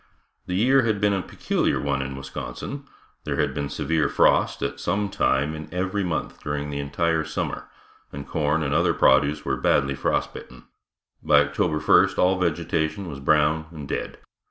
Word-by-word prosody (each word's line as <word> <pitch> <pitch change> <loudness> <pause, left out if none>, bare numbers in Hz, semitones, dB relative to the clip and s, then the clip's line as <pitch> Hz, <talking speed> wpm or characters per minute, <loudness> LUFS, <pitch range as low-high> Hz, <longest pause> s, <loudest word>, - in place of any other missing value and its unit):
The 90 - -2
year 130 +7 +4
had 110 -4 0
been 105 0 +2
a 95 - 0
peculiar - - -1
one 70 -1 -1
in 65 0 -5
Wisconsin. 70 - -7 0.4
There - - -2
had - - 0
been 70 -1 -3
severe 80 +1 0
frost - - +2
at - - -3
some 100 0 -1
time 70 -4 +1
in 80 0 -8
every 95 +3 -1
month 85 -3 -3
during 75 0 -3
the 70 - -3
entire 80 +3 0
summer - - -4 0.4
and 70 0 -8
corn 75 0 0
and 70 -1 -1
other - - +2
produce 75 +1 +3
was - - -1
badly 70 0 +2
frost 70 - -1
bitten. 65 -1 -11 0.6
By 75 -1 +5
October 75 +3 0
first 75 - +4
all 90 +1 +3
vegetation 85 +2 -1
was 70 -3 -7
brown 75 +3 +2
and 75 -4 -9
dead. - - -4
80 Hz, 175 wpm, -24 LUFS, 70-90 Hz, 0.6 s, By